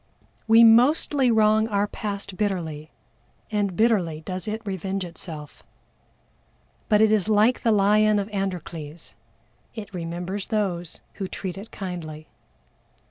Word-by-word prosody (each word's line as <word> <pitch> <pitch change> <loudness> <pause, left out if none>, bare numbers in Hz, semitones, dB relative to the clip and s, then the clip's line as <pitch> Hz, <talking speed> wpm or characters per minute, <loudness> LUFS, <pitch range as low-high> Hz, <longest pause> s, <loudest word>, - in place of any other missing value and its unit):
We 225 +1 +7
mostly 255 +3 +5
wrong 220 -1 +4
our 205 -2 +1
past 200 -2 -5
bitterly, 165 -7 -3 0.6
and 205 -3 0
bitterly 185 -9 +1
does 185 +3 -5
it 215 +1 -4
revenge 190 -1 -3
itself. 160 -3 -7 1.3
But 210 -1 +4
it 220 - +4
is 215 -1 +2
like 215 +4 +3
the 230 - +2
lion 210 +1 +4
of 200 -1 -1
ANDROCLES, 175 -6 -5 0.6
it 210 -2 -8
remembers 180 +3 -4
those 185 -7 -2 0.2
who 195 - -3
treat 185 -1 -5
it 200 +3 -9
kindly. 160 -5 -7
200 Hz, 125 wpm, -24 LUFS, 175-215 Hz, 1.3 s, We